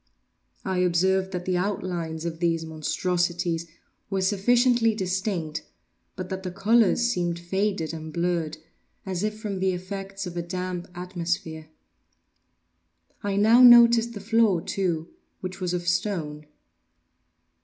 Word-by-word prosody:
I 190 -1 -1
observed 190 +2 +2
that 180 -1 -4
the 185 -1 0
outlines 175 -4 -3
of 165 -1 -4
these 165 -1 0
monstrosities 170 +1 -1 0.4
were 195 -1 -1
sufficiently 230 +3 +3
distinct, 185 -5 -2 0.5
but 185 -1 -6
that 190 -1 -4
the 185 - -4
colors 210 +4 +3
seemed 175 -7 -1
faded 185 -1 -2
and 160 -1 -7
blurred, 170 -1 -1 0.5
as 185 -2 -3
if 215 0 -2
from 205 -3 -4
the 190 0 +1
effects 195 +2 -6
of 175 -1 -7
a 175 - -1
damp 180 0 -4
atmosphere. 170 -3 -4 1.5
I 200 -1 -2
now 220 +5 +5
noticed 235 -1 +7
the 205 - -7
floor, 220 -3 +3
too, 170 -2 -2 0.3
which 185 +1 -7
was 180 -1 -1
of 175 -1 -3
stone. 160 -5 -1
185 Hz, 130 wpm, -25 LUFS, 170-200 Hz, 1.5 s, noticed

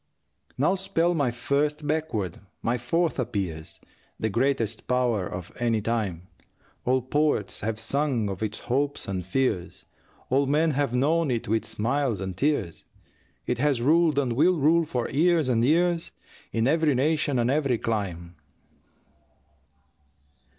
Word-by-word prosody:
Now 150 +8 +3
spell 175 -3 +1
my 145 -6 +1
first 145 +5 -1
backward, 145 - -2 0.2
my 120 +1 0
fourth 165 +7 0
appears, 95 -10 -4 0.4
The 110 - -1
greatest 115 -2 0
power 120 -7 +1
of 90 -1 -7
any 115 -2 +1
time. 105 -6 -2 0.6
All 130 0 +2
poets 130 -8 +1
have 110 +1 -2
sung 125 -1 0
of 95 -1 -5
its 110 0 -3
hopes 140 +3 -1
and 95 -2 -3
fears, 95 -1 -2 0.5
All 135 +1 +3
men 155 +3 +2
have 140 -2 0
known 150 +5 +2
it 120 -3 -2
with 110 +1 0
smiles 115 +1 -1
and 95 -1 -4
tears, 115 - -1 0.6
It 125 -1 -1
has 145 -2 +2
ruled 155 +4 +3
and 130 -4 +1
will 170 +8 +3
rule 160 +3 +3
for 125 -6 -2
years 165 -2 +2
and 115 -2 +2
years 170 +4 +2 0.4
In 115 +1 +1
every 155 -1 +2
nation 145 0 +1
and 120 +1 +2
every 140 -4 +1
clime. 90 -7 -3
125 Hz, 140 wpm, -26 LUFS, 110-150 Hz, 0.6 s, Now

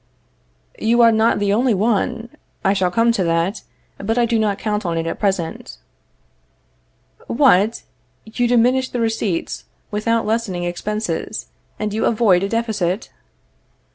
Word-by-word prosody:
You 235 +2 +3
are 230 - +7
not 220 +1 +3
the 205 -1 +1
only 235 +1 +2
one. 225 +2 0 0.4
I 195 - +4
shall 190 -2 +1
come 230 +6 +3
to 205 -5 0
that; 170 +5 0 0.4
but 225 +4 -1
I 240 - +4
do 230 -1 +1
not 210 -2 +1
count 210 -1 -2
on 170 -2 -2
it 165 - -1
at 165 - -4
present. 190 - -2 1.5
What! 230 -5 +3 0.4
you 240 +3 -1
diminish 250 +2 +3
the 245 - -3
receipts, 225 -6 -2 0.3
without 225 +2 0
lessening 215 -5 -1
expenses, 210 +2 -3 0.3
and 210 -1 -3
you 220 - 0
avoid 210 -6 +3
a 195 - -1
deficit? 215 -4 -1
215 Hz, 140 wpm, -20 LUFS, 195-230 Hz, 1.5 s, are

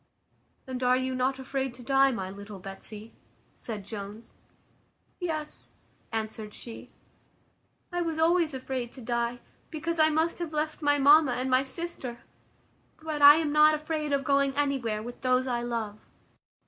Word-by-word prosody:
"And 260 -1 -5
are 250 0 +4
you 260 0 -1
not 255 +1 0
afraid 265 -1 -3
to 250 - -11
die, 270 +2 +4
my 190 -6 -4
little 200 +1 -9
Betsy?" 200 +3 -9 0.4
said 210 -4 -7
Jones. 210 +2 -8 0.9
"Yes," 310 -4 -4 0.4
answered 220 -1 -4
she, 230 -2 -10 1.0
"I 350 0 -1
was 330 -2 -2
always 325 -2 +3
afraid 255 -2 -4
to 260 - -10
die; 235 +1 -2 0.3
because 325 +1 -3
I 310 0 +6
must 320 +3 0
have 335 -3 -4
left 310 +1 -2
my 290 -1 +3
mamma, 290 -1 +6
and 255 +1 -2
my 255 0 +5
sister; 270 -4 -5 0.8
but 310 -2 -4
I 290 +1 +11
am 315 -2 0
not 305 +1 +6
afraid 305 -1 -3
of 280 -1 +1
going 275 0 +2
anywhere 260 -7 0
with 240 +1 -9
those 255 0 +2
I 240 -2 -1
love." 225 -3 -3
265 Hz, 155 wpm, -28 LUFS, 235-305 Hz, 1.0 s, I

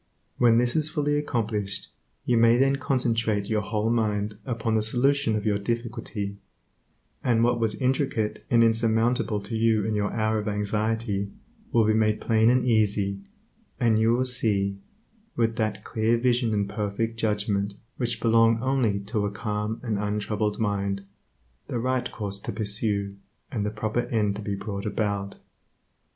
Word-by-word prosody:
When 115 -2 +5
this 120 0 +1
is 155 -1 +2
fully 145 -2 0
accomplished, 110 -8 -1 0.4
you 125 - +2
may 115 +1 +5
then 135 +1 +3
concentrate 115 -6 0
your 105 0 0
whole 105 +2 -1
mind 105 -2 0
upon 115 -2 -1
the 110 - +3
solution 125 +2 +1
of 105 0 -2
your 105 -2 +1
difficulty, 115 -2 -4 0.9
and 115 -3 +3
what 120 0 +2
was 115 -2 -1
intricate 130 -4 0
and 115 -1 +5
insurmountable 115 0 +2
to 105 +3 -6
you 110 -2 +2
in 110 - -1
your 105 -1 0
hour 110 0 0
of 105 - -5
anxiety 105 0 -1 0.4
will 115 -2 +4
be 110 - +3
made 110 -1 +2
plain 110 0 +3
and 125 +1 +3
easy, 100 -4 +1 0.6
and 115 -2 +3
you 115 +1 +4
will 130 +1 +1
see, 100 -6 +1 0.6
with 115 -1 +1
that 110 -2 -1
clear 115 0 +1
vision 120 -1 +1
and 100 -2 0
perfect 105 +2 -3
judgment 105 -2 0 0.2
which 120 -2 -1
belong 115 0 +4
only 125 -6 +1
to 105 0 -1
a - - -4
calm 105 +1 -3
and 110 -4 -1
untroubled 105 0 -1
mind, 100 -2 -1 0.6
the 125 - -3
right 130 +1 -1
course 100 -2 -4
to - - -5
pursue 100 -1 -1 0.3
and 110 -6 -2
the 105 - 0
proper 110 +3 -2
end 105 -4 0
to 105 - -6
be 100 -1 -3
brought 100 0 -5
about. 100 -1 -2
110 Hz, 160 wpm, -26 LUFS, 105-115 Hz, 0.9 s, When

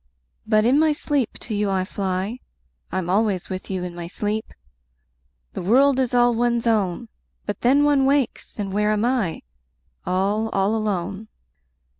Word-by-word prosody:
5 - - -31
But 215 0 +4
in 260 +5 +4
my 315 -1 +4
sleep 285 -5 -1
to 225 - -5
you 205 -1 0
I 190 -1 0
fly: 195 +4 -3 0.5
I'm 185 -2 -2
always 195 -1 0
with 185 0 -6
you 185 -2 -2
in 180 -1 -5
my 170 -1 -6
sleep! 210 +4 -3 1.0
The - - -4
world 260 +8 +4
is 255 -2 +1
all 245 -1 +4
one's 235 0 0
own. 215 -1 0 0.4
But 205 -1 -4
then 275 +4 +4
one 285 -2 +3
wakes, 275 -3 0
and 200 -3 -3
where 210 +1 +1
am 215 +1 +1
I? 240 -10 -1 0.6
All, 200 +4 0
all 195 +1 +1
alone. 200 -1 -2
215 Hz, 165 wpm, -23 LUFS, 190-245 Hz, 1.0 s, But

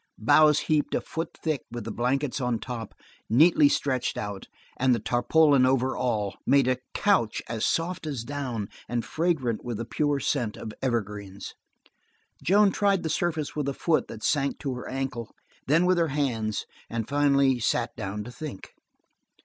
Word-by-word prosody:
Boughs 150 +7 +5
heaped 155 -2 +1
a - - 0
foot 165 +1 -5
thick 155 -5 0
with 120 -1 -6
the 115 - -5
blankets 130 +4 -1
on 125 -2 0
top, 115 -2 -6 0.3
neatly 150 +4 +6
stretched 130 -4 0
out, 100 -2 -5 0.3
and 130 -1 +3
the - - -2
tarpaulin 140 +2 +3
over 130 0 +2
all, 105 -6 -1
made 140 -2 +4
a 130 -1 +1 0.2
couch 195 - +2
as 115 -1 -2
soft 165 -1 -1
as 135 -6 -3
down 125 -6 -4 0.2
and 120 -1 -1
fragrant 155 -9 -1
with 120 -3 -4
the 115 - -4
pure 145 +3 0
scent 125 -5 -1
of 110 - -7
evergreens. 105 -5 -3 0.9
Joan 200 +2 +4
tried 200 -2 +1
the 160 - -2
surface 155 -2 -1
with 145 -2 -1
a 135 - -4
foot 165 -2 +1
that 110 -1 -9
sank 140 +2 +1
to 135 -4 -3
her 125 - -7
ankle, 130 -4 -4 0.3
then 160 +6 +4
with 180 -1 +3
her 165 - +3
hands, 120 -8 -1 0.2
and 115 -2 -3
finally 140 -2 +3
sat 115 +1 0
down 105 -1 -4
to 120 - -9
think. 135 -5 -8
130 Hz, 170 wpm, -27 LUFS, 115-150 Hz, 0.9 s, neatly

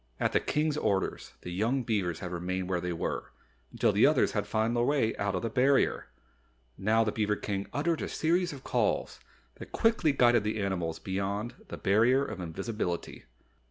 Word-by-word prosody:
At - - +1
the - - +3
King's 150 0 0
order, 100 -8 0 0.2
the 90 - -7
young 115 +8 0
beavers 95 -8 -1
had 90 -2 -5
remained 90 +1 -3
where 90 -2 -1
they 90 0 -2
were, 85 - -3 0.4
until - - +2
the - - +5
others - - +3
had - - -2
found 110 +2 0
their 120 - +2
way 130 -4 +1
out 100 -1 -1
of 90 - -2
the 115 - -1
Barrier. 135 +3 +2 0.7
Now 110 +3 +2
the 110 - 0
beaver 105 -1 0
King 100 -1 -3
uttered 160 +3 0
a - - -3
series 175 +3 +1
of 135 -3 -9
calls - - 0 0.4
that - - -10
quickly 225 -9 +2
guided 120 -4 +4
the 105 +1 -2
animals 90 -5 -2
beyond 100 +4 -3
the - - -7
Barrier 120 +8 +3
of 95 - -6
Invisibility. 90 - -4
110 Hz, 185 wpm, -29 LUFS, 95-130 Hz, 0.7 s, the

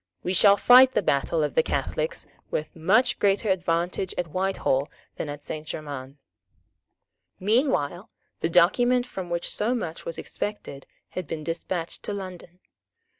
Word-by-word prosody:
We 180 - -1
shall 200 +2 +6
fight 255 +3 +7
the - - +1
battle 155 +2 +1
of 150 - -1
the - - +4
Catholics - - -2 0.2
with 155 - -3
much 190 +10 +3
greater 200 +2 +2
advantage 175 0 -1
at 175 -2 -2
Whitehall 185 -7 0 0.3
than 150 - -4
at 145 0 -7
Saint 155 0 -6
Germains." 140 -3 -6 1.2
Meanwhile 200 - +1 0.3
the 165 - 0
document 245 +9 +4
from 190 -7 -7
which 170 0 -2
so 230 +4 0
much 165 -9 -5
was 165 - -4
expected 175 -10 -6 0.2
had 185 -4 -5
been 155 +1 -5
despatched 170 +1 -4
to 205 - -4
London. 185 -2 -8
180 Hz, 145 wpm, -25 LUFS, 160-205 Hz, 1.2 s, fight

